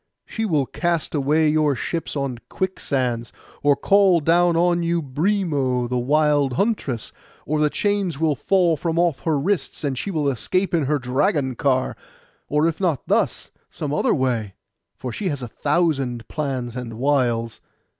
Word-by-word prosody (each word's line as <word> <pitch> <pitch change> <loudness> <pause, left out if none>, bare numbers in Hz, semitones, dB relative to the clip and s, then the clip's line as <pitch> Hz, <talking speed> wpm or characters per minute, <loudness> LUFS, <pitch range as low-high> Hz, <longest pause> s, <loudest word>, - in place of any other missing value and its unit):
She 225 - -3
will 155 -9 +1
cast 170 +3 -2
away 150 +2 +2
your 150 -2 +2
ships 165 +7 -4
on 135 -4 -2
quicksands, 130 -10 -2 0.3
or 145 -1 +4
call 195 +1 +4
down 170 +2 +3
on 175 0 +3
you 170 0 +1
Brimo 145 -5 0
the 125 0 -1
wild 145 +1 +2
huntress; 140 - -1 0.3
or 155 +1 0
the 150 - +3
chains 200 -5 -1
will 160 -2 +2
fall 180 +1 +2
from 165 +2 -2
off 170 -4 +2
her 155 -3 0
wrists, 190 +3 -1
and 140 -2 -1
she 165 - -4
will 155 -6 0
escape 180 - 0
in 160 -4 +2
her 150 +2 +1
dragon 130 +2 0
car; 130 +1 0 0.5
or 150 +2 +2
if 165 +3 -3
not 165 -8 0
thus, - - 0 0.2
some 145 -2 -4
other - - +2
way, 120 -7 -1 0.4
for 125 - -6
she 190 - -2
has 140 -3 -4
a - - -4
thousand 135 -4 0
plans 130 -5 -3
and 125 -3 -5
wiles. 120 -3 0
150 Hz, 165 wpm, -22 LUFS, 130-170 Hz, 0.5 s, or